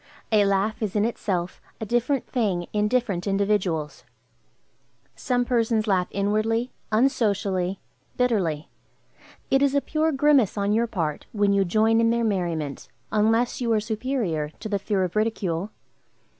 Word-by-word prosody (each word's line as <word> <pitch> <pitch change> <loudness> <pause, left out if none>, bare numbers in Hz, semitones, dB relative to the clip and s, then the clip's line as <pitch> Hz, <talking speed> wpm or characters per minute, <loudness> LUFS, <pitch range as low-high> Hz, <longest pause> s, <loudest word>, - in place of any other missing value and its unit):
A 210 -2 +4
laugh 200 +3 0
is 215 -3 -2
in 210 0 +2
itself 185 -6 -3 0.2
a 220 - -4
different 240 +4 0
thing 195 -8 -1
in 210 0 +2
different 210 -6 -1
individuals. 190 -9 0 1.1
Some 245 -1 0
persons 230 -3 +1
laugh 185 -4 +1
inwardly, 215 +4 0 0.2
unsocially, 200 -6 +1 0.4
bitterly. 190 - 0 0.8
It 270 - +4
is 280 0 +2
a - - +5
pure 315 +2 0
grimace 275 -7 +3
on 200 +1 +1
your 230 +2 +2
part 165 -9 -3
when 205 -2 +2
you 200 0 +3
join 220 +5 +3
in 230 - +3
their 235 0 +1
merriment, 170 -9 -2 0.2
unless 225 +4 +1
you 235 -2 0
are 215 - +3
superior 215 - -2
to 220 - -5
the 205 -2 -1
fear 195 -1 0
of 180 +1 -3
ridicule. 205 -4 -1
215 Hz, 145 wpm, -24 LUFS, 190-235 Hz, 1.1 s, a